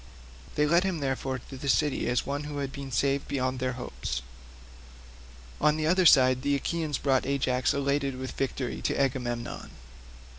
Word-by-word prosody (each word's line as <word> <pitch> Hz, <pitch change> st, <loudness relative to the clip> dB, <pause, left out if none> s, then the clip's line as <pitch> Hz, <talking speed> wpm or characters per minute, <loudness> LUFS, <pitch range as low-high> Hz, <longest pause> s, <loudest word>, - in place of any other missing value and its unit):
They 150 Hz, -, +3 dB
led 170 Hz, +4 st, +4 dB
him, 190 Hz, -3 st, -1 dB
therefore, 135 Hz, -1 st, -2 dB
to 130 Hz, +2 st, -11 dB
the 140 Hz, +1 st, -4 dB
city 150 Hz, -3 st, +2 dB
as 125 Hz, -, +1 dB
one 140 Hz, +1 st, -2 dB
that 145 Hz, -1 st, -5 dB
had 140 Hz, -1 st, -3 dB
been 135 Hz, -1 st, -7 dB
saved 140 Hz, +1 st, +1 dB
beyond 130 Hz, -1 st, -1 dB
their 130 Hz, 0 st, -1 dB
hopes. -, -, -5 dB, 1.4 s
On 150 Hz, +1 st, +4 dB
the 155 Hz, -, -1 dB
other 180 Hz, +2 st, +5 dB
side 130 Hz, -3 st, +6 dB
the 140 Hz, +1 st, +1 dB
Achaeans 155 Hz, +1 st, -1 dB
brought 135 Hz, -2 st, +1 dB
Ajax 130 Hz, -2 st, +1 dB
elated 140 Hz, -1 st, 0 dB
with 130 Hz, 0 st, -5 dB
victory 135 Hz, -1 st, -3 dB
to -, -, -1 dB
Agamemnon. 120 Hz, -3 st, -2 dB
135 Hz, 170 wpm, -28 LUFS, 130-145 Hz, 1.4 s, side